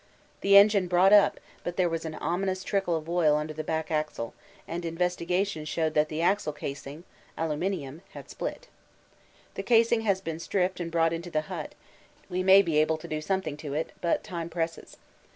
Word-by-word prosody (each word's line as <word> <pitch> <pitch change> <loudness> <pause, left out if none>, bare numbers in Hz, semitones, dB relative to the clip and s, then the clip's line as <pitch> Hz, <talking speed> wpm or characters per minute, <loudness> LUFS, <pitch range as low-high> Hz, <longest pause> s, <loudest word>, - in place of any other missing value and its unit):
The 200 0 +6
engine 200 -2 +6
brought 180 +3 +5
up, 205 - +5 0.2
but 175 - -4
there 180 -2 +3
was 165 -1 -3
an 155 -1 -5
ominous 185 +2 -2
trickle 195 -3 0
of 160 -1 -4
oil 165 -3 +3
under 150 +1 -3
the 155 +1 -5
back 160 +1 -2
axle, 150 -7 -2 0.3
and 170 +1 -4
investigation 180 +1 -1
showed 155 0 -1
that 150 0 +2
the 160 +1 -2
axle 190 -4 +1
casing 145 +2 -7 0.3
(aluminium) 160 -2 -2
had - - -10
split. - - -6 0.9
The - - -4
casing 230 -1 +3
has 200 -4 +1
been 165 -4 -5
stripped 180 +1 -1
and 170 -1 -3
brought 165 0 +2
into 170 +1 -5
the 155 -2 0
hut; 155 - -7 0.6
we 180 +1 0
may 190 +1 +7
be 160 -4 +1
able 155 +1 +2
to 155 - -10
do 155 0 -3
something 190 -2 -2
to 145 -2 -6
it, 160 +2 -2
but 170 - +1
time 170 -4 -5
presses. 165 -1 -4
170 Hz, 190 wpm, -28 LUFS, 155-190 Hz, 0.9 s, may